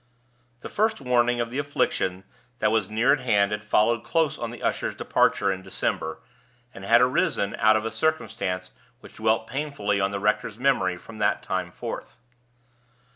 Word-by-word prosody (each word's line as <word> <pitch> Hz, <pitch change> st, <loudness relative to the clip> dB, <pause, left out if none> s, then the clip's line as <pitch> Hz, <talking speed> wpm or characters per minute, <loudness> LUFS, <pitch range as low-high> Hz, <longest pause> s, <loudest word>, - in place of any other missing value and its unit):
The -, -, -6 dB
first 220 Hz, +1 st, 0 dB
warning 120 Hz, -2 st, +2 dB
of 115 Hz, 0 st, -2 dB
the 130 Hz, -, -2 dB
affliction 95 Hz, -10 st, -1 dB, 0.3 s
that 110 Hz, -2 st, +1 dB
was 110 Hz, -4 st, +1 dB
near 115 Hz, +6 st, +3 dB
at 145 Hz, -, 0 dB
hand 105 Hz, -5 st, +2 dB
had 105 Hz, 0 st, -2 dB
followed 110 Hz, +2 st, +2 dB
close 160 Hz, -3 st, +1 dB
on 120 Hz, -4 st, -4 dB
the 120 Hz, -, -10 dB
usher's -, -, -1 dB
departure 100 Hz, -1 st, +2 dB
in 95 Hz, -1 st, -4 dB
December, -, -, -3 dB, 0.5 s
and 95 Hz, -, -10 dB
had 115 Hz, +4 st, +5 dB
arisen 125 Hz, -5 st, +1 dB
out 110 Hz, +1 st, +5 dB
of 110 Hz, 0 st, 0 dB
a 115 Hz, -, -2 dB
circumstance 110 Hz, -12 st, -2 dB, 0.3 s
which -, -, -14 dB
dwelt 110 Hz, 0 st, +1 dB
painfully 125 Hz, -8 st, -2 dB
on 95 Hz, -, +2 dB
the 100 Hz, 0 st, -3 dB
rector's 105 Hz, +1 st, 0 dB
memory 115 Hz, -9 st, +1 dB
from 110 Hz, +4 st, -12 dB
that 105 Hz, -, +1 dB
time -, -, -2 dB
forth. 120 Hz, -, -7 dB
110 Hz, 175 wpm, -25 LUFS, 100-125 Hz, 0.5 s, had